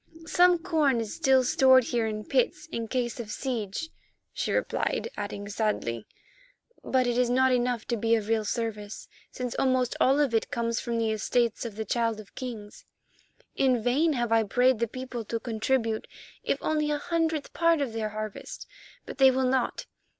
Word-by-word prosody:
"Some 355 +2 +4
corn 315 -7 +1
is 220 -2 -4
still 265 -1 +3
stored 260 +1 +5
here 230 -1 -1
in 215 -1 -4
pits 285 +4 0
in 230 -5 -3
case 245 0 -2
of 225 -3 -6
siege," 230 +4 -3 0.4
she - - -2
replied, - - -1
adding 205 0 -5
sadly, 200 - -2 0.8
"but 260 -1 +1
it 245 0 0
is 250 -1 +2
not 260 +1 +3
enough 245 -2 0
to 240 - -1
be 225 +2 +2
of 215 -2 -2
real 225 -1 +1
service, 210 -1 -4 0.2
since 250 -1 -5
almost 255 -2 +1
all 270 +3 +4
of 280 -5 +2
it 225 - +1
comes 235 0 -1
from 235 -1 -3
the 225 -1 +1
estates 230 +2 0
of 225 -3 -6
the 220 0 -4
Child 230 -2 0
of 210 - -13
Kings. 225 -5 -8 0.7
In 255 -3 +3
vain 295 +7 +2
have 240 -3 -1
I 225 0 +5
prayed 245 +3 +2
the 235 - +1
people 255 0 -6
to 230 +2 -3
contribute, 225 -1 -1 0.4
if - - 0
only 305 -1 0
a 295 - +1
hundredth 320 -1 -1
part 335 -1 +3
of 270 -5 -2
their 220 -1 -2
harvest, 215 -1 -7 0.4
but - - -9
they 265 -1 +8
will 260 0 +1
not. 255 -1 0
240 Hz, 180 wpm, -27 LUFS, 220-265 Hz, 0.8 s, they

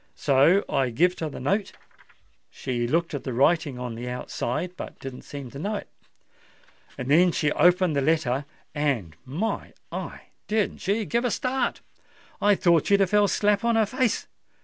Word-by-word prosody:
So 145 +8 +4
I 135 -2 +1
gived 175 +10 +2
her 160 - -2
the - - -8
note: 195 +10 -1 0.8
she 120 -3 -3
looked 165 +6 0
at 145 - -4
the 130 - -4
writing 145 +1 +2
on 125 -1 -5
the 120 +2 -6
outside, 125 +7 -3
but - - -8
didn't 130 -1 -8
seem 140 -4 -8
to 140 - -8
know 205 +7 -2
it. - - -6 1.1
Then 155 +8 +4
she 150 -2 0
opened 180 +1 +3
the 140 - +2
letter—and, 140 - -1
my 165 - -3 0.2
eye! - - -6 0.3
didn't 215 -1 0
she 205 +3 0
give 235 +4 0
a 245 - +1
start? 255 +3 -1 0.6
I 205 0 +5
thought 170 -4 +3
she'd 200 0 +4
have 190 - +2
fell 210 -1 +4
slap 205 +2 +2
on 235 -1 +2
her 220 -1 +4
face. 255 +2 0
160 Hz, 170 wpm, -25 LUFS, 135-200 Hz, 1.1 s, I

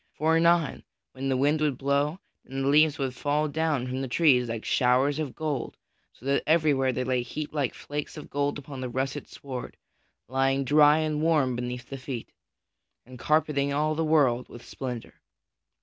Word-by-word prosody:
For 160 +2 +2
anon, 170 -2 +2 0.3
when 135 +1 -4
the 130 - +1
wind 145 +3 +2
would 145 -4 +1
blow, 140 +4 0 0.3
then 135 +1 -4
the 135 - +2
leaves 150 +1 +4
would 135 -2 -2
fall 145 +3 0
down 155 -3 0
from 130 +1 -3
the 135 - -3
trees 125 -3 +3
like 115 -1 -4
showers 130 +3 +2
of 150 -5 -4
gold 150 -5 -3 0.3
so 125 - -19
that 140 +1 +2
everywhere 150 -5 +3
they 130 0 -2
lay 125 -1 0
heaped 150 +5 -6
like 140 -5 -1
flakes 145 +2 -6
of 150 - -8
gold 145 0 -1
upon 140 -2 -8
the 130 - -3
russet 135 +3 -3
sward, 130 -3 -7 0.5
rustling 135 +1 +1
dry 150 +2 +6
and 155 -1 -1
warm 150 -6 +2
beneath 125 0 -5
the 135 - -6
feet, 130 -3 -6 0.7
and 125 0 -12
carpeting 150 -1 +1
all 155 +2 +1
the 160 +1 -1
world 140 -6 +2
with 120 - -12
splendor. 125 -4 -7
140 Hz, 180 wpm, -27 LUFS, 130-150 Hz, 0.7 s, dry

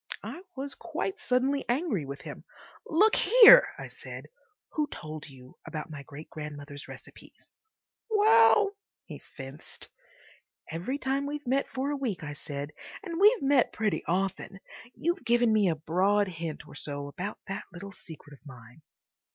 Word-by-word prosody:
I 245 - -7
was 275 +1 -5
quite 395 +2 -4
suddenly 265 +2 +1
angry 240 - 0
with 140 +1 -7
him. - - -9 0.4
"Look 420 +7 +4
here," - - +9
I - - -7
said, - - -9 0.4
"who 300 -1 0
told 155 - -8
you 130 -2 -16
about 155 0 -6
my 150 -2 -7
great 140 +3 -11
grandmother's 145 -2 -8
recipes?" - - -13 0.6
"Well," 400 - +5 0.3
he - - -9
fenced. 135 +2 -10 0.8
"Every 180 - -3
time 275 0 -1
we've 295 0 -5
met 270 +3 +1
for 270 +2 -2
a - - -1
week," 230 -12 -3
I 145 -1 -5
said, 145 0 -6 0.3
"and 340 -4 -4
we've 420 - +5
met 275 -2 +3
pretty 215 -2 -1
often—you've 195 - -3
given 240 -1 +3
me 210 -4 +4
a 165 - +1
broad 190 +6 +2
hint 165 -3 -6
or - - -13
so 145 -1 -5
about 180 +8 -5
that 195 - -5
little 190 +3 -9
secret 160 -5 -13
of 145 - -17
mine." 125 0 -14
200 Hz, 150 wpm, -29 LUFS, -, 0.8 s, here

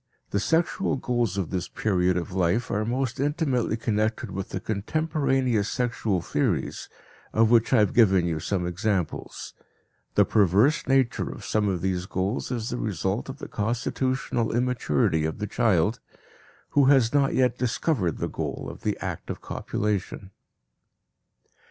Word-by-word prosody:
The 100 - +1
sexual 165 - +1
goals 120 -6 -1
of 95 -5 -2
this 90 -2 -2
period 90 -4 +1
of 90 +1 -4
life 95 +5 +1
are 105 - 0
most 125 +2 -2
intimately 140 -5 0
connected 110 -1 -1
with 95 0 -5
the - - -3
contemporaneous 130 - 0
sexual 115 -7 -1
theories, - - -1 0.4
of 110 +1 +4
which 115 -2 +4
I 130 - +5
have 105 -3 +3
given 95 -7 +5
you 80 -2 -1
some 90 +2 -1
examples. 90 +1 -2 0.6
The - - +5
perverse 105 - +3
nature 135 -2 +2
of - - -8
some 105 -1 +1
of 90 -3 -2
these 95 -1 -1
goals 95 +6 -2
is 120 -3 -3
the 120 - -2
result 100 - -2
of 135 - -6
the - - -7
constitutional 120 +1 -1
immaturity 110 - +1
of 80 0 -2
the 105 - -3
child, 105 -1 +1 0.7
who 140 -2 +4
has 130 -4 +4
not 140 -1 +2
yet 125 -2 +2
discovered 115 - 0
the - - -2
goal - - -4
of - - -13
the - - -1
act - - -5
of - - -4
copulation. 100 -2 -3
110 Hz, 150 wpm, -26 LUFS, 95-125 Hz, 0.7 s, I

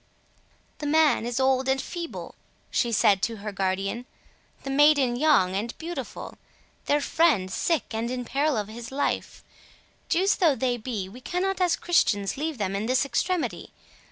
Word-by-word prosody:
"The 295 - -3
man 300 -6 +3
is 240 0 -2
old 265 0 +2
and 265 0 +2
feeble," 340 +3 -6 0.4
she 240 - +1
said 205 -3 +4
to 230 - -1
her 210 0 -6
guardian, 195 +5 -2 0.6
"the 270 - -4
maiden 280 -3 +4
young 245 -10 +3
and 225 +4 -3
beautiful, 340 +2 -7 0.5
their 290 0 +2
friend 280 - +2
sick 325 - -1
and 225 +2 -2
in 250 -1 -3
peril 285 +1 0
of 210 -2 -2
his 230 +3 -8
life—Jews 340 +6 -3
though 325 -6 +4
they 255 -2 0
be, 215 -5 -4
we 235 +7 -12
cannot 370 +6 -2
as 355 -2 +3
Christians 205 - +1
leave 305 0 -3
them 195 -2 -2
in 205 +3 -2
this 260 +2 +2
extremity. 275 - -2
255 Hz, 155 wpm, -26 LUFS, 215-305 Hz, 0.6 s, said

